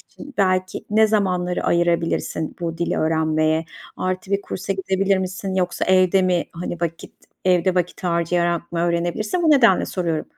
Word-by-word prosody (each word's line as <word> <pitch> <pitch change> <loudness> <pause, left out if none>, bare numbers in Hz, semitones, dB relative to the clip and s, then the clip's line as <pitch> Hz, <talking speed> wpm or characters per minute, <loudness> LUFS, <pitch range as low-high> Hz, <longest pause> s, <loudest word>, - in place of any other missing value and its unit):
için, 290 -1 -13
belki, 185 -1 0
ne 220 +1 +5
zamanları 180 -4 0
ayırabilirsin 170 -2 0
bu 165 -1 -4
dili 170 - -1
öğrenmeye? 155 0 +1 0.3
Artı, 185 +1 -3
bir 200 - +1
kursa 195 0 -4
gidebilir 195 0 0
misin, 190 +1 -4
yoksa 180 -2 -1
evde 185 0 +4
mi, 180 -2 +1
hani, 170 0 -5
vakit, 165 -1 -4 0.3
evde 185 0 +3
vakit 180 +1 -2
harcayarak 170 0 0
mı 170 - -1
öğrenebilirsin? 175 - -1
Bu 320 - +4
nedenle 235 -10 +5
soruyorum. 170 -4 -2
180 Hz, 150 wpm, -21 LUFS, 170-190 Hz, 0.3 s, ne